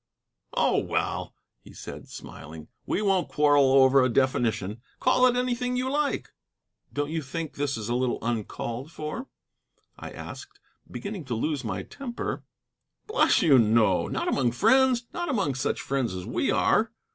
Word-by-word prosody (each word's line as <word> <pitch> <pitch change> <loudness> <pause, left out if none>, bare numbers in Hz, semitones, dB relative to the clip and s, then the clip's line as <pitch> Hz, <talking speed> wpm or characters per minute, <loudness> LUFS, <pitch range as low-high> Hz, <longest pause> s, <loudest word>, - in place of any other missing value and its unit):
"Oh, - - +3
well," - - -2 0.2
he - - -16
said, - - -9
smiling, 80 +1 -10 0.2
"we 215 - 0
won't 195 -3 +2
quarrel 145 -2 +4
over 135 0 +6
a 130 - +3
definition. 115 -4 0 0.2
Call 255 0 +4
it 245 - +2
anything 250 0 0
you 260 +1 -1
like." 295 0 -1 0.6
"Don't 145 +1 -2
you 160 0 -1
think 155 +3 -5
this 140 -3 -2
a 120 - -1
little 125 0 0
uncalled 120 +4 -3
for?" 155 - -5 0.7
I - - -7
asked, - - -10 0.3
beginning 200 -6 -6
to 125 -3 -3
lose 140 +4 -1
my 100 -4 -3
temper. 250 - -5 0.6
"Bless 435 +3 +3
you, 140 -6 +6
no. 110 -4 +3
Not - - -2
among 125 -4 +1
friends: 255 - +4
not 345 -1 -3
among 200 - 0
such 130 - -1
friends 130 -8 -1
as 90 -1 -6
we - - -1
are." - - +2
140 Hz, 155 wpm, -26 LUFS, -, 0.7 s, over